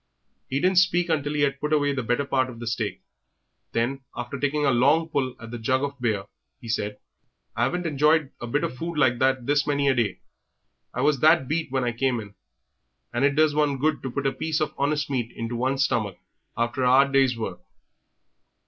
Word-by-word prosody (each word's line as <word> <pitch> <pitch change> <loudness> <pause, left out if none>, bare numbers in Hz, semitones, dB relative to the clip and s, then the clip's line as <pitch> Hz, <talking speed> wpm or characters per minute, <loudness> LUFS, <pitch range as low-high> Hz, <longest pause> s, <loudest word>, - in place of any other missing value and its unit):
He 135 - 0
didn't 185 +2 +4
speak 175 -1 +2
until 145 -2 0
he 145 - 0
had 140 -1 +1
put 150 +1 -3
away 145 -2 +2
the 135 - -2
better 120 +4 0
part 130 -2 +1
of 120 - -9
the 120 - -6
steak; 115 0 -3 0.7
then, 125 +4 -1
after 125 +3 -5
taking 145 +1 0
a 140 - +4
long 145 +7 +3
pull 135 -5 -1
at 115 -1 -10
the 120 - -5
jug 130 +4 +1
of 140 -2 -4
beer, 110 -5 0 0.4
he 115 - -11
said 105 -2 -2 0.6
"I 120 +1 +2
'aven't 180 +5 -3
enjoyed 150 -1 +2
a 120 - -4
bit 145 +5 0
of 125 - -2
food 165 +4 -5
like 125 -5 +3
that 130 -2 +1
this 145 +1 +1
many 140 -1 +2
a - - +4
day; 115 -7 -1 0.7
I - - -3
was 145 -1 +2
that 155 -2 +4
beat 155 -1 -2
when 130 -1 0
I 120 - 0
came 125 +1 0
in, 105 -2 -9 0.8
and 120 +3 0
it 140 0 +3
does 155 0 +4
do 150 - -1
one 145 -2 +2
good 155 +2 0
to 130 - -4
put 140 +2 -4
a 135 - +3
piece 160 0 -2
of 150 -1 -1
honest 145 +1 0
meat 120 -4 -2
into 115 +1 -3
one's 130 +3 +1
stomach 110 -9 -1 0.4
after 120 +2 -1
a 125 - +4
'ard 135 +2 +5
day's 135 -3 +3
work!" 110 - -4
135 Hz, 220 wpm, -25 LUFS, 120-150 Hz, 0.8 s, ard